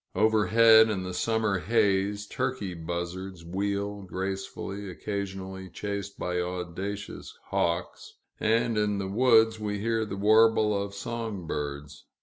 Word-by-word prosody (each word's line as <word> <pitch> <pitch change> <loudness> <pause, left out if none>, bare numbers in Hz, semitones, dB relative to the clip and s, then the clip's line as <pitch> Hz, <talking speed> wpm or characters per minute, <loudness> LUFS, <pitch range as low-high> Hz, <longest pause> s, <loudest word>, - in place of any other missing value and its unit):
Overhead, 110 +2 +6
in 95 -4 -1
the 90 0 -5
summer 110 0 +1
haze, 105 -1 +1
turkey 105 -3 -3
buzzards 85 +2 -5
wheel 100 +3 -2
gracefully, 95 +1 -5
occasionally 95 -1 -5
chased 100 +2 -5
by 90 0 -2
audacious 90 +3 -5
hawks; 85 +1 -2 0.2
and 115 0 +2
in 105 -1 +1
the 95 -1 -2
woods, 110 0 +4
we 105 -1 -2
hear 115 +2 0
the 100 -2 -5
warble 110 +1 +5
of 100 0 -3
song 110 -4 -4
birds. 75 -1 -5
100 Hz, 125 wpm, -28 LUFS, 95-110 Hz, 0.2 s, Overhead